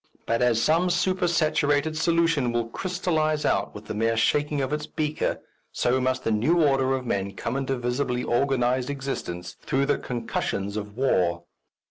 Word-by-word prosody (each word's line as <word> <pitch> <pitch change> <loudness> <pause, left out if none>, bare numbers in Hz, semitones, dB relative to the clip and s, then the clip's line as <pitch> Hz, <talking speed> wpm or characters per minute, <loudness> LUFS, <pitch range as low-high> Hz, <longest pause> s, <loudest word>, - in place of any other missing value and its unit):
But 115 +1 0
as 120 -2 +3
some 165 +8 +3
supersaturated 160 -5 +1
solution 165 -5 +2
will 120 -1 -1
crystallize 160 -2 -1
out - - 0
with 105 +1 -9
the - - -5
mere 115 +2 +1
shaking 145 +5 +1
of 135 +1 -1
its 150 0 -3
beaker, 155 0 -2 0.3
so 130 +2 +1
must 130 0 0
the - - 0
new 125 +11 +2
order 135 -3 +3
of 130 -1 -4
men 100 -3 -2
come 115 +5 -3
into 135 -1 -1
visibly 125 0 -1
organized 125 0 +1
existence 135 -11 -5
through 135 +1 0
the 145 - +1
concussions 105 -4 -3
of 105 0 -6
war. 90 -10 +1
135 Hz, 160 wpm, -25 LUFS, 115-155 Hz, 0.3 s, as